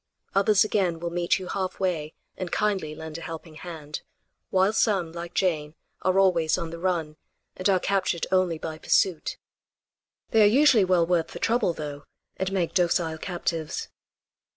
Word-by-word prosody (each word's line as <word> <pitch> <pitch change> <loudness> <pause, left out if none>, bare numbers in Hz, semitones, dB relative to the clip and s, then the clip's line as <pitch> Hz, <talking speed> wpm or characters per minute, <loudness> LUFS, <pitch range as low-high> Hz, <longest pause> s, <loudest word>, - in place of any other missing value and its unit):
Others 200 +2 +4
again 190 -6 0
will 170 0 -3
meet 175 +1 +1
you 190 - -7
half 190 0 -3
way 165 -5 -1 0.2
and 185 -2 -5
kindly 190 -8 0
lend 160 +1 -7
a - - -11
helping 165 0 -7
hand; 155 -2 -7 0.5
while 190 +2 +3
some, 195 -7 +1
like 170 +1 -7
Jane, 155 -5 0 0.3
are 185 0 +2
always 170 -5 +3
on 165 -1 -4
the 170 - -7
run, 165 -4 -1 0.4
and 185 +2 0
are 190 -2 +4
captured 190 -3 0
only 185 -3 +2
by 155 0 -6
pursuit. 180 -1 +1 0.9
They 225 - +5
are 210 - +8
usually 245 -3 +5
well 180 -2 +3
worth 170 -1 +1
the - - -9
trouble 230 -6 +2
though, 145 -2 -7 0.3
and 190 0 -2
make 185 -4 0
docile 170 -3 +1
captives. 165 -3 -3
175 Hz, 165 wpm, -26 LUFS, 160-190 Hz, 0.9 s, are